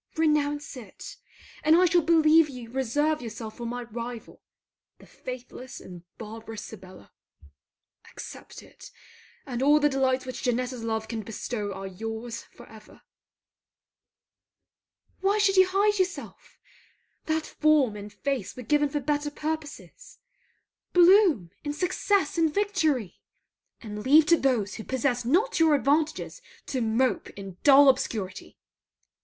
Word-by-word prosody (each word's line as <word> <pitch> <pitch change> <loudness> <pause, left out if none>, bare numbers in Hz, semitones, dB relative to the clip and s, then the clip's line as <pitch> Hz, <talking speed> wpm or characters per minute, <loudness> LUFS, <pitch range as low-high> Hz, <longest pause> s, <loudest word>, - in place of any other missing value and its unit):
Renounce 295 -3 0
it, 225 -7 -10 0.5
and 310 +2 +5
I 360 +2 +5
shall 350 0 +4
believe 320 -1 +5
you 245 -4 -9
reserve 290 +5 0
yourself 225 -2 -7
for 235 - -5
my 245 +1 -4
rival, 235 0 -8 0.6
the - - -17
faithless 255 0 -9
and 180 -2 -11 0.2
barbarous 225 0 -8
Sibella. 185 - -13 1.0
Accept - - -10
it, - - -14 0.6
and 250 -2 -4
all 295 +2 +5
the 295 0 +3
delights 265 -1 0
which 255 -1 -6
Janetta's 250 0 -2
love 220 -1 -2
can 225 -1 -4
bestow 210 0 -5
are 195 0 -7
your's 225 +4 -6
for 240 - -16
ever. 215 -2 -16 2.2
Why 395 +2 +1
should 400 -2 +3
you 375 -1 +6
hide 405 +2 +2
yourself? 370 0 -4 0.7
That 315 0 0
form 300 -8 +2
and 205 0 -8
face 250 0 -3
were 250 - -8
given 295 +4 +2
for 290 +1 -2
better 295 +1 -1
purposes. 310 +10 -6 0.8
Bloom 350 - +5
in 290 -1 -3
success 360 0 0
and 325 -2 +3
victory! 315 - -1 0.6
And 210 -2 -7
leave 295 +4 +6
to 335 +2 +5
those 235 -9 0
who 220 - -7
possess 250 -1 -1
not 375 - +2
your 320 -2 +5
advantages 305 - 0 0.2
to 260 - -3
mope 225 0 0
in 195 -2 -9
dull 280 0 +7
obscurity! 220 -8 -1
265 Hz, 135 wpm, -26 LUFS, 225-310 Hz, 2.2 s, dull